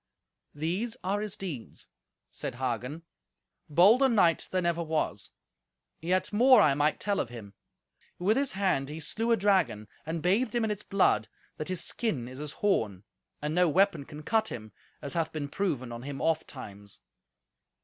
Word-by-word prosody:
"These 180 +10 -2
are 200 +3 0
his 210 -2 -4
deeds," 160 -12 -7 0.4
said - - -4
Hagen; 130 +5 -3 0.7
"bolder 210 - +6
knight 180 -8 +3
there 185 - 0
never 170 0 +1
was. 155 - -2 0.7
Yet 185 +5 0
more 250 +3 +7
I 150 -9 +5
might 150 +2 +1
tell 205 -1 0
of - - -1
him. 110 -4 -10 0.6
With 200 +5 +2
his 275 +1 +1
hand 185 -9 0
he 155 +2 -6
slew 225 +9 -1
a 230 - +5
dragon, 190 - +2 0.2
and 160 0 -4
bathed 210 +6 +2
him 235 - +2
in 220 - 0
its 210 -1 -3
blood, 190 - +2 0.3
that 155 - -4
his 185 -2 -2
skin 165 - -2
is 130 +2 -9
as 150 -1 -6
horn, 105 - +1 0.4
and 150 +1 -1
no 180 0 +4
weapon 190 -3 +2
can 150 0 -10
cut 220 +4 +2
him, 110 - -7 0.3
as 140 - -4
hath 165 -2 -1
been 150 -2 -4
proven 140 -8 -2
on 120 0 -6
him 140 +1 -6
ofttimes." 130 -11 -3
165 Hz, 170 wpm, -29 LUFS, 135-200 Hz, 0.7 s, more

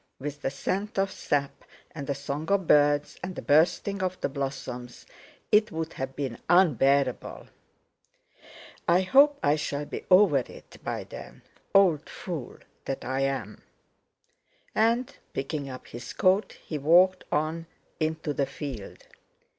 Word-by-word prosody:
With 145 +1 -6
the - - 0
scent 195 +9 -3
of 195 0 +1
sap, 140 -1 -2 0.3
and 140 -3 -6
the 140 - -1
song 140 +3 -4
of 200 -2 +2
birds, 145 -1 +3
and 185 0 -5
the - - -5
bursting 175 +6 +2
of 185 0 -2
the - - 0
blossoms, 130 -3 -5 0.5
it 210 0 +4
would 160 0 -4
have 130 0 -5
been 135 -5 -4
unbearable! 140 - +2 1.4
"I 175 +2 +5
hope 280 +9 +5
I 145 +1 +4
shall 145 -1 -3
be - - -6
over 185 -6 +6
it 125 - -11
by - - -3
then, - - -11 0.3
old 175 -6 +4
fool 160 -9 -6 0.3
that 135 - -4
I 130 +2 -1
am!" 135 -6 -2 1.1
and 230 +3 +1 0.2
picking 140 +1 -3
up 130 -1 -8
his 120 +1 -8
coat, 190 +1 +2
he 155 - -6
walked 180 +6 +5
on 160 +2 -1 0.3
into 155 -1 -1
the 140 -1 0
field. 130 -9 -7
150 Hz, 140 wpm, -27 LUFS, 135-185 Hz, 1.4 s, over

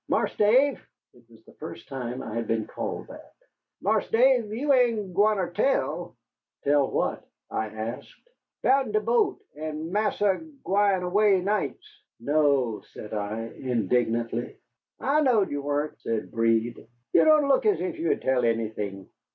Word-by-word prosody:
"Marse - - 0
Dave," 255 +6 +3 0.3
it 120 - -21
was 115 -1 -20
the - - -17
first 115 - -9
time 130 -1 -5
I 110 - -6
had 115 -1 -3
been 110 -1 0
called - - -5
that, - - -13 0.5
"Marse 210 +1 +1
Dave, 240 -2 +3
you 275 +6 +1
ain't 230 -7 +2
gwineter 200 -1 +2
tell?" 270 +8 0 0.5
"Tell 140 -1 +3
what?" - - -1 0.3
I 110 - -1
asked. 110 +3 -6 0.5
"Bout'n 270 +5 +3
de 430 - +4
boat, 430 -4 +1 0.2
and 155 +1 -5
Marsa 205 -2 +1 0.3
agwine 195 -1 +2
away 195 +2 +3
nights." 205 +2 -2 0.3
"No," 140 -4 +1
said 105 - -9
I, 105 +1 -3
indignantly. 120 0 -1 0.4
"I 295 +3 +2
knowed 235 -8 +3
you 145 0 -2
wahn't," 145 +1 -2
said 115 -1 -3
Breed. 115 0 0 0.3
"You - - +6
don' 305 -2 +5
look 280 +10 +3
as 415 - +3
if 350 -3 -4
you'd 335 - 0
tell 130 -2 +2
anything." 110 -4 -2
155 Hz, 150 wpm, -26 LUFS, -, 0.5 s, You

